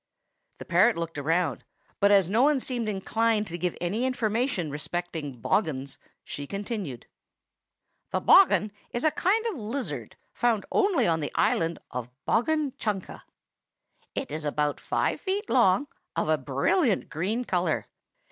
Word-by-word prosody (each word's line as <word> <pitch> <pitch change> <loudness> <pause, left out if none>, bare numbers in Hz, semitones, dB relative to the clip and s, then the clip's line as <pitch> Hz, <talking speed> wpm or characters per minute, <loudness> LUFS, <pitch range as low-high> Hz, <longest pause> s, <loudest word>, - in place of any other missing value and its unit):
The - - -9
parrot 185 +6 +4
looked 165 -2 -4
around, 165 0 0 0.4
but 200 - +5
as 195 -4 +5
no 215 +6 +2
one 290 0 +4
seemed 240 -4 -2
inclined 215 +2 +1
to 175 -3 -5
give 180 0 -1
any 195 +8 -1
information 235 - 0
respecting 150 -3 -4
bogghuns, 140 - -1 0.2
she 145 0 -7
continued, 195 - -5 1.0
"The - - 0
bogghun 280 - +6 0.2
is 240 - -3
a 310 - +4
kind 425 +8 +1
of 440 -8 -2
lizard, 210 - -4 0.2
found 235 -4 +1
only 405 -4 +3
on 165 -1 +2
the 145 - -3
island 165 0 +2
of 125 -1 -4 0.2
Bogghun 300 +4 +1
Chunka. 205 -4 -3 0.9
It - - -3
is 155 +1 -4
about 150 0 0
five - - -1
feet 405 +2 -2
long, 235 0 +4 0.3
of - - 0
a - - +4
brilliant 275 - +1
green 200 +10 -1
color. 180 -3 0
200 Hz, 145 wpm, -27 LUFS, 165-245 Hz, 1.0 s, bogghun